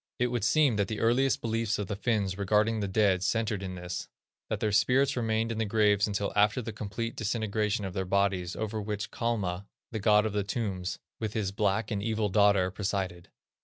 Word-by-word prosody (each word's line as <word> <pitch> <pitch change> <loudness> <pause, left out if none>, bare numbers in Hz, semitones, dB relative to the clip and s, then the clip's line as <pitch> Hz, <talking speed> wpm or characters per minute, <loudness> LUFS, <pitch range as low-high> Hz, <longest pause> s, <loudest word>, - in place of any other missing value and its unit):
It 125 -1 +1
would 120 -4 -1
seem 130 +1 +3
that 100 -1 +1
the 110 0 -4
earliest 125 +3 +2
beliefs 115 -1 0
of 105 - -2
the 100 - -4
Finns 100 -3 0
regarding 105 +3 +2
the 100 - -1
dead 95 -2 +2
centred 110 +1 0
in 95 -1 -5
this: 90 0 -5 0.4
that - - -1
their 105 - 0
spirits 130 +6 +3
remained 115 -1 0
in 115 - -3
their 110 - 0
graves 105 -1 +3
until 100 -1 -2
after 105 +4 +3
the 115 -2 -5
complete 110 +2 -4
disintegration 110 -1 -1
of 95 - -5
their 95 - -1
bodies, 95 -1 0
over 110 0 -3
which 105 -1 -4
Kalma, 100 -6 -2 0.2
the 110 - -3
god 105 0 +4
of 110 - -2
the 105 -1 0
tombs, 100 -4 -3 0.2
with 110 -2 -3
his 105 -3 -1
black 105 +2 0
and 100 -2 -1
evil 110 -1 0
daughter, 100 -2 +4
presided. 95 -3 -3
105 Hz, 200 wpm, -29 LUFS, 100-110 Hz, 0.4 s, god